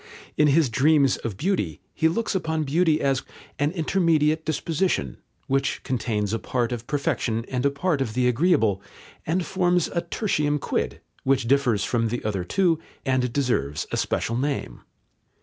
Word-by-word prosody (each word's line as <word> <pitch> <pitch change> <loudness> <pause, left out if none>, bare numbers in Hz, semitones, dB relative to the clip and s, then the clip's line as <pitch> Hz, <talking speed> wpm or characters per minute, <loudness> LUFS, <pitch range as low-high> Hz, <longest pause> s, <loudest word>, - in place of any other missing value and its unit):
In 150 - +4
his 150 +1 +4
Dreams 140 +2 +4
of 110 -5 -5
Beauty, 150 - -1
he 160 - +2
looks 220 +9 -1
upon 160 -4 -1
beauty 155 +2 +2
as 135 -3 +1 0.4
"an 145 +1 +2
intermediate 160 -3 +2
disposition," 155 - -1 0.3
which 135 0 0
contains 110 -4 -1
a 115 - 0
part 120 0 -1
of 120 -1 -5
perfection 120 -5 -1
and 130 +1 +1
a - - +3
part 145 +1 -1
of 115 -4 -2
the 125 0 +2
agreeable, 125 - +2 0.5
and 170 +2 0
forms 180 -2 +1
a 170 - -1
tertium 150 -5 0
quid, - - -2 0.2
which 130 -3 +1
differs 125 -6 +2
from 115 +1 0
the 120 +1 -4
other 100 -4 -1
two 170 - +1 0.3
and 130 -2 +1
deserves 120 - 0
a - - -1
special 115 - -1
name. 140 +3 -2
140 Hz, 160 wpm, -24 LUFS, 120-160 Hz, 0.5 s, In